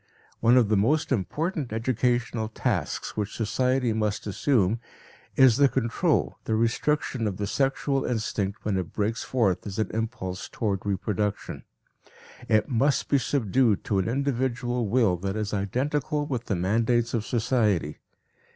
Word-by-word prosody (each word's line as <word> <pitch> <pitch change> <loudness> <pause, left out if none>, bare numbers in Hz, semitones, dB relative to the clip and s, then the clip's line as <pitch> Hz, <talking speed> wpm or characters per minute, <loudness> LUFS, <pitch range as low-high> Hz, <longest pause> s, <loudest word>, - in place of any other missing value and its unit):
One 115 +2 +5
of 115 -5 +4
the 110 - +3
most 145 +11 +1
important 130 - -1
educational 120 0 0
tasks 115 - -2
which 105 -1 -3
society 125 +2 +1
must 105 -2 -1
assume 105 0 +1 0.6
is 130 -3 +6
the 140 -1 +5
control, 115 -4 0
the 110 - 0
restriction 115 +1 0
of 95 -3 -3
the 105 - -2
sexual 135 +5 0
instinct 105 -4 -2
when 105 -2 0
it 90 -3 -4
breaks 110 +2 -1
forth 105 -7 0
as 100 - -6
an 110 - -1
impulse 110 -5 -4
toward 100 -3 -2
reproduction; 100 +1 -2 0.8
it 110 -1 +3
must 135 +1 +1
be 140 - +4
subdued 120 -4 +1
to 100 - 0
an 95 - -1
individual 125 -2 -1
will 105 -5 +2
that 95 +3 -3
is 105 -1 -3
identical 140 - -1
with 125 -5 -3
the 100 - -1
mandates 115 +6 +1
of 115 -3 0
society. 110 - 0
115 Hz, 145 wpm, -26 LUFS, 105-130 Hz, 0.8 s, is